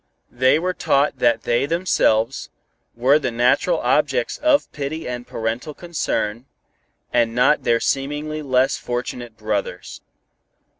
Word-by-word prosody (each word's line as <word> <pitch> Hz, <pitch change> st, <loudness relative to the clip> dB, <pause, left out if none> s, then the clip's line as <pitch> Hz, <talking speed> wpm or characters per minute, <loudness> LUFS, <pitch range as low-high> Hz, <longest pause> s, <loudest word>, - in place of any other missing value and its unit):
They 130 Hz, +4 st, +3 dB
were 180 Hz, +3 st, -1 dB
taught 140 Hz, -4 st, +1 dB
that 120 Hz, -1 st, +2 dB
they 120 Hz, +3 st, +1 dB
themselves, 135 Hz, -8 st, +1 dB, 0.5 s
were 130 Hz, +5 st, +4 dB
the 130 Hz, -, -1 dB
natural 125 Hz, -, +2 dB
objects -, -, +1 dB
of 295 Hz, -1 st, +2 dB
pity 150 Hz, +3 st, -5 dB
and 125 Hz, 0 st, -5 dB
parental 115 Hz, +7 st, -4 dB
concern, 130 Hz, -8 st, -3 dB, 0.7 s
and 115 Hz, -1 st, +2 dB
not 130 Hz, +5 st, +3 dB
their 115 Hz, 0 st, +3 dB
seemingly 150 Hz, +4 st, -2 dB
less 130 Hz, -1 st, +1 dB
fortunate 120 Hz, -1 st, -5 dB
brothers. 105 Hz, -2 st, -4 dB
130 Hz, 120 wpm, -21 LUFS, 120-155 Hz, 0.7 s, were